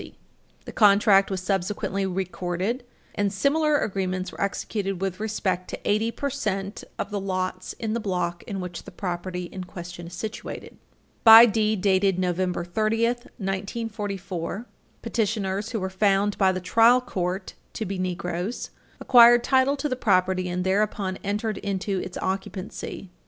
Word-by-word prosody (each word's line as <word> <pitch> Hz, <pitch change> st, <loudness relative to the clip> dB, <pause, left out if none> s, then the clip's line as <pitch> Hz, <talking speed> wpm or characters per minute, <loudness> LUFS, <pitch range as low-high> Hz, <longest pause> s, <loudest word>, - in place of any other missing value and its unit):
The -, -, -7 dB
contract 200 Hz, -2 st, +5 dB
was 190 Hz, -2 st, -2 dB
subsequently 195 Hz, +1 st, -1 dB
recorded, 185 Hz, +5 st, -2 dB, 0.3 s
and 205 Hz, -1 st, 0 dB
similar 295 Hz, +8 st, +2 dB
agreements 185 Hz, -5 st, -2 dB
were -, -, -9 dB
executed 200 Hz, -1 st, -2 dB
with 190 Hz, 0 st, -3 dB
respect 190 Hz, -4 st, -2 dB
to -, -, -5 dB
eighty 215 Hz, +2 st, +2 dB
percent 215 Hz, -7 st, -3 dB
of -, -, -4 dB
the 205 Hz, -, -1 dB
lots 185 Hz, -1 st, -3 dB
in 220 Hz, -1 st, -3 dB
the 235 Hz, -, 0 dB
block 180 Hz, -5 st, -2 dB
in 195 Hz, -2 st, -4 dB
which 180 Hz, -2 st, -6 dB
the -, -, -11 dB
property 180 Hz, -1 st, -4 dB
in 185 Hz, +1 st, -7 dB
question 175 Hz, -1 st, -8 dB
is 175 Hz, -, -9 dB
situated. 215 Hz, +5 st, -7 dB, 0.4 s
By 225 Hz, +1 st, +11 dB
deed 215 Hz, -2 st, +1 dB
dated 195 Hz, -1 st, +3 dB
November 180 Hz, -1 st, -1 dB
30, 215 Hz, +5 st, +1 dB
1944, 200 Hz, -3 st, -4 dB, 0.4 s
petitioners, 205 Hz, -2 st, -1 dB
who 225 Hz, -, -2 dB
were 190 Hz, -, -2 dB
found 200 Hz, +1 st, +2 dB
by 190 Hz, -2 st, +3 dB
the 185 Hz, -, -3 dB
trial 230 Hz, +7 st, +5 dB
court 190 Hz, -6 st, -3 dB, 0.2 s
to 220 Hz, -, -3 dB
be 195 Hz, -1 st, -4 dB
Negroes, 180 Hz, +3 st, -3 dB, 0.3 s
acquired 240 Hz, -1 st, +7 dB
title 265 Hz, +2 st, +3 dB
to 280 Hz, -, -1 dB
the 255 Hz, -, -1 dB
property, 185 Hz, -5 st, +1 dB
and 180 Hz, +1 st, -2 dB
thereupon 195 Hz, 0 st, 0 dB
entered 210 Hz, +2 st, -2 dB
into 195 Hz, -1 st, -2 dB
its 180 Hz, -, -6 dB
occupancy. 190 Hz, 0 st, -5 dB
195 Hz, 145 wpm, -25 LUFS, 185-215 Hz, 0.4 s, By